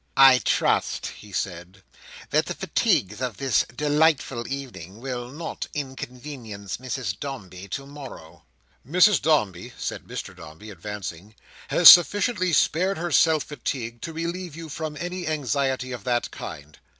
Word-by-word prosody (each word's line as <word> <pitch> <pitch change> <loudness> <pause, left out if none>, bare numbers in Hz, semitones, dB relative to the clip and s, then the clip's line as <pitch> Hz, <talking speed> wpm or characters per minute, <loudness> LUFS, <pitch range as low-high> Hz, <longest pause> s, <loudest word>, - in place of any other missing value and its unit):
"I 135 -1 +8
trust," - - +1
he 105 - -14
said, 90 +1 -5 0.5
"that - - +2
the - - -3
fatigues 105 +5 0
of 125 -5 -3
this 135 -2 +2
delightful 150 -4 +1
evening 120 -9 -7
will 125 -1 -5
not 160 +5 -6
inconvenience 125 -6 -6
Mrs 125 -5 -4
Dombey 100 - -7
to 135 +6 -5
morrow." 135 - -11 0.4
"Mrs 180 - +4
Dombey," 110 - +1
said - - -5
Mr - - -7
Dombey, 80 +9 -11
advancing, 100 0 -7 0.3
"has 175 - +6
sufficiently 185 - +7
spared 185 +4 +2
herself 160 -2 +3
fatigue, 120 -5 -5
to 165 - -5
relieve 170 0 -4
you 165 -1 -8
from 155 +1 -5
any 180 +1 -4
anxiety 135 -3 -1
of 120 -4 -6
that 120 -1 0
kind. 75 +1 -9
130 Hz, 135 wpm, -25 LUFS, 105-155 Hz, 0.5 s, I